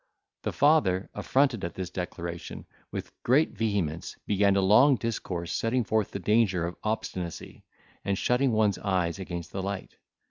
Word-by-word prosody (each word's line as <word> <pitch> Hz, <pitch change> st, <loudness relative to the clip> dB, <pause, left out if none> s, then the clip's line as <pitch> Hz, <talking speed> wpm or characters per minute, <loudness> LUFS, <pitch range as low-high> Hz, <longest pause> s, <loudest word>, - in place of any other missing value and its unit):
The -, -, -2 dB
father, 120 Hz, -12 st, +3 dB
affronted 130 Hz, +1 st, +1 dB
at 85 Hz, 0 st, -4 dB
this 90 Hz, -1 st, -5 dB
declaration, 85 Hz, -1 st, -6 dB, 0.3 s
with -, -, -5 dB
great 140 Hz, +6 st, +3 dB
vehemence 100 Hz, -8 st, -2 dB
began 100 Hz, -1 st, +3 dB
a 100 Hz, -, +3 dB
long 120 Hz, +9 st, +6 dB
discourse, 100 Hz, -7 st, -3 dB
setting 120 Hz, +2 st, +1 dB
forth 110 Hz, -1 st, 0 dB
the -, -, -5 dB
danger 100 Hz, -3 st, +2 dB
of 85 Hz, +1 st, -4 dB
obstinacy, 95 Hz, -5 st, -4 dB, 0.4 s
and 100 Hz, -1 st, 0 dB
shutting 125 Hz, +4 st, +2 dB
one's 105 Hz, -4 st, +2 dB
eyes 90 Hz, -3 st, 0 dB
against 85 Hz, -3 st, -6 dB
the 95 Hz, -, -3 dB
light. 100 Hz, 0 st, -5 dB
100 Hz, 150 wpm, -28 LUFS, 90-115 Hz, 0.4 s, long